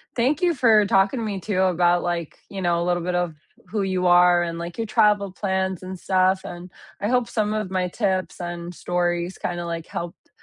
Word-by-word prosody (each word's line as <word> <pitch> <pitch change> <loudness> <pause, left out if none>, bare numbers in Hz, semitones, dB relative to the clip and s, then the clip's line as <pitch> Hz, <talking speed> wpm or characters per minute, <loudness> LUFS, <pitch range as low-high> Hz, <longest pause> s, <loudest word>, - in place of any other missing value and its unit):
thank 270 +8 +1
you 345 -1 +4
for 220 -6 +4
talking 195 +5 +2
to - - -2
me, 200 -3 -3
too, 185 0 -2
about, 175 -1 +3
like, 170 -3 -3
you 195 - -6
know, 170 -1 +1
little 175 0 0
bit 180 +1 -2
of 175 -2 0 0.4
who 210 -1 -1
you 185 -1 -1
are 175 0 +5
and, 170 0 -4
like, 170 0 -6
your 230 - -1
travel 210 -2 +2
plans 190 -2 -2
and 185 0 -7
stuff, 185 0 +2
and 175 +1 -8 0.3
I 205 - 0
hope 245 -1 +2
some 215 -2 -1
of 215 -3 -3
my 185 -1 0
tips 185 -3 -2
and 175 0 -6
stories 175 +2 -1
kinda, 175 -1 -3
like, 165 -1 -5
helped 170 0 -7
185 Hz, 205 wpm, -23 LUFS, 175-205 Hz, 0.4 s, are